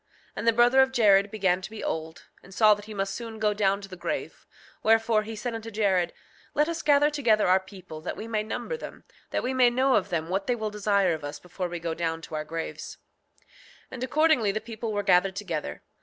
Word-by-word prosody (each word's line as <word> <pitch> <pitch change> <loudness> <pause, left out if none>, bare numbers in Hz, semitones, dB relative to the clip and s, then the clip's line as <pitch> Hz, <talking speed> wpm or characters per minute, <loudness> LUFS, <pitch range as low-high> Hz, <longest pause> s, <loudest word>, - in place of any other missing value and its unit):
6:19 - - -34
And - - -3
the 230 - +6
brother 240 +3 +5
of 265 0 +3
Jared 205 -5 +4
began 190 -3 +1
to 190 - -7
be 220 0 -8
old, 160 +1 -4 0.2
and 190 - -16
saw 215 -2 +6
that 205 0 -7
he 215 - -9
must 195 0 -2
soon 230 -2 -7
go 215 -1 +1
down 200 -1 +1
to 195 - -9
the 185 - -9
grave; 175 - -5 0.3
wherefore 225 0 +3
he 220 +1 -7
said 235 +2 -4
unto 225 0 -6
Jared: 200 -5 +1 0.4
Let 300 +1 +3
us 335 0 -3
gather 290 0 +4
together 235 -8 +2
our 185 +1 +5
people 185 -5 -11
that - - -5
we 220 - -6
may 220 -2 -1
number 225 - -4
them, - - -10 0.3
that - - -2
we 255 - -1
may 255 -2 +5
know 260 +2 +2
of 200 - -2
them 165 -3 -2
what 195 +2 -2
they 245 - +2
will 215 -2 -3
desire 200 -3 +2
of 155 -2 -6
us 145 0 -5
before 180 +1 -5
we 175 0 -5
go 165 -1 -3
down 165 0 -3
to - - -10
our 155 0 -2
graves. 165 +1 -6 0.4
6:20 - - -33 0.5
And 255 -1 -6
accordingly 260 -6 +3
the 215 - -2
people 225 0 -6
were 205 -1 -1
gathered 190 0 +3
together. 175 -7 -4
210 Hz, 240 wpm, -27 LUFS, 185-230 Hz, 0.5 s, the